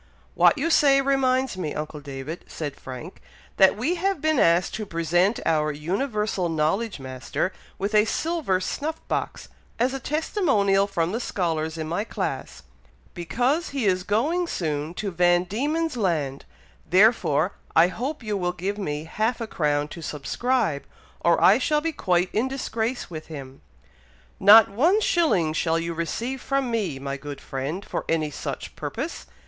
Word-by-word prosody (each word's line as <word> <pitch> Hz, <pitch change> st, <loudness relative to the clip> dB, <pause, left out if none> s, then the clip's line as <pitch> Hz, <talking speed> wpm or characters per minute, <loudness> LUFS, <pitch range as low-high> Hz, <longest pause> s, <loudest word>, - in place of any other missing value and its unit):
"What -, -, +5 dB
you 325 Hz, +4 st, 0 dB
say 275 Hz, -3 st, +5 dB
reminds 265 Hz, -4 st, +1 dB
me, 160 Hz, -5 st, -3 dB
uncle 150 Hz, 0 st, -5 dB
David," 140 Hz, +3 st, -7 dB
said 145 Hz, -3 st, -5 dB
Frank, 130 Hz, +7 st, -9 dB, 0.4 s
"that 190 Hz, +1 st, +6 dB
we 260 Hz, +11 st, 0 dB
have 390 Hz, -3 st, +1 dB
been 310 Hz, -2 st, +1 dB
asked 170 Hz, +2 st, +3 dB
to 215 Hz, -, -4 dB
present 175 Hz, +5 st, +1 dB
our 155 Hz, -1 st, +2 dB
Universal 195 Hz, -, -1 dB
Knowledge 165 Hz, +6 st, 0 dB
Master 130 Hz, +7 st, -3 dB, 0.2 s
with 200 Hz, +2 st, -2 dB
a 210 Hz, 0 st, +5 dB
silver 310 Hz, -, 0 dB
snuff 295 Hz, +11 st, -3 dB
box, -, -, -3 dB, 0.3 s
as 250 Hz, +3 st, +1 dB
a 270 Hz, -, -3 dB
testimonial 255 Hz, -, +1 dB
from 175 Hz, -4 st, -1 dB
the 225 Hz, -, -2 dB
scholars 165 Hz, -7 st, -2 dB
in 160 Hz, -1 st, -4 dB
my 175 Hz, +6 st, -1 dB
class, -, -, -4 dB, 0.5 s
because 250 Hz, -, 0 dB
he 250 Hz, -, 0 dB
is 185 Hz, -2 st, +2 dB
going 290 Hz, -, 0 dB
soon 155 Hz, -, -3 dB
to 200 Hz, +1 st, -3 dB
Van 175 Hz, 0 st, +3 dB
Dieman's 295 Hz, -, -1 dB
Land, 155 Hz, -, -1 dB, 0.4 s
therefore 185 Hz, -4 st, +4 dB, 0.2 s
I 165 Hz, +2 st, +6 dB
hope 255 Hz, +8 st, -4 dB
you 215 Hz, -1 st, -2 dB
will 180 Hz, -2 st, -1 dB
give 195 Hz, +4 st, -3 dB
me 150 Hz, -6 st, -3 dB
half 220 Hz, +9 st, -1 dB
a 230 Hz, -, -3 dB
crown 150 Hz, -7 st, 0 dB
to 170 Hz, -, -9 dB
subscribe, 160 Hz, -, -1 dB, 0.4 s
or 170 Hz, -1 st, +3 dB
I 205 Hz, +6 st, +6 dB
shall 300 Hz, +3 st, +2 dB
be 330 Hz, +2 st, -2 dB
quite 180 Hz, -, +1 dB
in 225 Hz, +5 st, +1 dB
disgrace 245 Hz, -4 st, -3 dB
with 155 Hz, -1 st, -7 dB
him." 135 Hz, -4 st, -9 dB, 0.8 s
"Not 210 Hz, +2 st, +9 dB
one 315 Hz, -, +3 dB
shilling 305 Hz, -, +2 dB
shall 165 Hz, 0 st, +1 dB
you 170 Hz, 0 st, -2 dB
receive 230 Hz, +11 st, -3 dB
from 275 Hz, -3 st, -1 dB
me, 200 Hz, -11 st, -1 dB
my 140 Hz, +1 st, -4 dB
good 145 Hz, 0 st, -8 dB
friend, 140 Hz, +9 st, -4 dB
for -, -, -3 dB
any 155 Hz, -2 st, 0 dB
such -, -, -6 dB
purpose! -, -, -5 dB
190 Hz, 160 wpm, -25 LUFS, 160-250 Hz, 0.8 s, Not